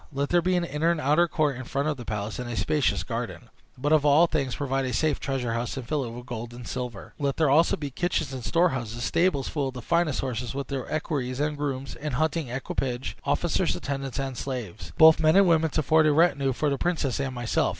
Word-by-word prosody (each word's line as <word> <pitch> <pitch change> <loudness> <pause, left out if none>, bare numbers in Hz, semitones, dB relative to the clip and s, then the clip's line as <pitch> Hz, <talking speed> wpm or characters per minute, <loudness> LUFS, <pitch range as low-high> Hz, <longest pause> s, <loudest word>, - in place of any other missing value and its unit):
Let 140 0 -2
there 175 0 +4
be 180 +2 +1
an 175 - +1
inner 160 0 0
and 170 -2 +1
outer 155 +4 +3
court 150 -5 0
in 130 - -6
front 140 +4 -2
of 155 - 0
the 120 -3 -9
palace, 105 +1 -4
and 125 -1 -4
a 120 - -4
spacious 150 -4 +1
garden; - - -5 0.3
but, 145 +4 -1
above 155 -2 +5
all 150 +3 +6
things, 140 -6 -1
provide 135 -2 -1
a 125 - -2
safe 150 +4 +1
treasure 130 -4 -2
house, 115 +3 -3
and 125 -3 -6
fill 150 -1 0
it 120 - -5
with 120 +1 -9
gold 120 -1 -6
and 120 -1 -9
silver. 125 -5 -6
Let 140 -2 -1
there 160 - +3
be - - +4
also 165 +3 +4
kitchens 145 0 -2
and 130 -2 -6
storehouses, 120 -9 0
stables 165 -5 +1
full 145 -3 -1
of 130 - -6
the 125 - -6
finest 170 -2 +1
horses, 125 -1 -4
with 140 0 -4
their 135 -3 -4
equerries 140 -5 -2
and 150 +1 0
grooms, 140 -2 -3
and 150 -3 -4
hunting 155 +1 0
equipage, 125 0 -3
officers, - - +1
attendants, 135 -3 -4
and 135 -2 -3
slaves, 120 -7 -5
both 160 0 +8
men 155 +1 +4
and 195 -1 +6
women, 160 -1 +3
to 155 - -1
form 155 +2 +4
a - - +5
retinue 145 -3 +3
for 145 +3 0
the 140 - -1
princess 160 -8 -1
and 135 -2 -2
myself. 120 -2 0
140 Hz, 240 wpm, -26 LUFS, 125-155 Hz, 0.3 s, both